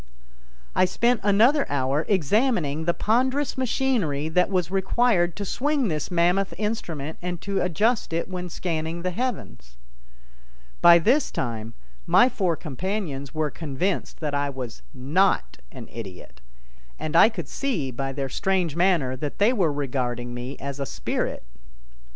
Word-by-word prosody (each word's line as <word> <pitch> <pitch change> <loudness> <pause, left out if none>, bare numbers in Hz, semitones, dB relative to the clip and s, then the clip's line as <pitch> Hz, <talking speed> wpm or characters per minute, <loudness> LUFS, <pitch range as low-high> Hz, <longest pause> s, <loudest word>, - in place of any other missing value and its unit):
] - - -29
I - - +7
spent 235 +6 +1
another 230 +9 +4
hour 140 +2 0
examining 185 - +1
the 170 - +2
ponderous 260 +6 +1
machinery 225 - 0
that 180 +3 +2
was 180 -3 0
required 195 -2 +2
to 205 - -4
swing 280 +2 0
this 155 -3 -2
mammoth 180 +3 +1
instrument 165 -9 -3
and 175 -1 -4
to 200 -1 -1
adjust 210 +7 +1
it 165 +1 -1
when 180 -1 -5
scanning 165 -1 -3
the 185 - 0
heavens. 60 - -5 1.0
By 170 0 +9
this 250 - +3
time 115 -2 -4 0.3
my 245 - +6
four 185 -8 0
companions 155 -3 -4
were 155 -2 0
convinced 165 +7 -3
that 150 -2 -2
I 145 0 0
was 125 - -7
not 140 - +1
an - - -9
idiot, 95 - -9 0.6
and 155 - -4
I 190 - +8
could 175 - -6
see 185 - -2
by 135 +2 -3
their 135 0 -3
strange 180 +1 0
manner 170 -8 +2
that 145 +2 -5
they 215 +5 +4
were 180 -10 +2
regarding 125 -4 -2
me 125 +3 -6
as 140 0 -6
a 140 - -2
spirit. 60 - -3
170 Hz, 150 wpm, -25 LUFS, 140-200 Hz, 1.0 s, By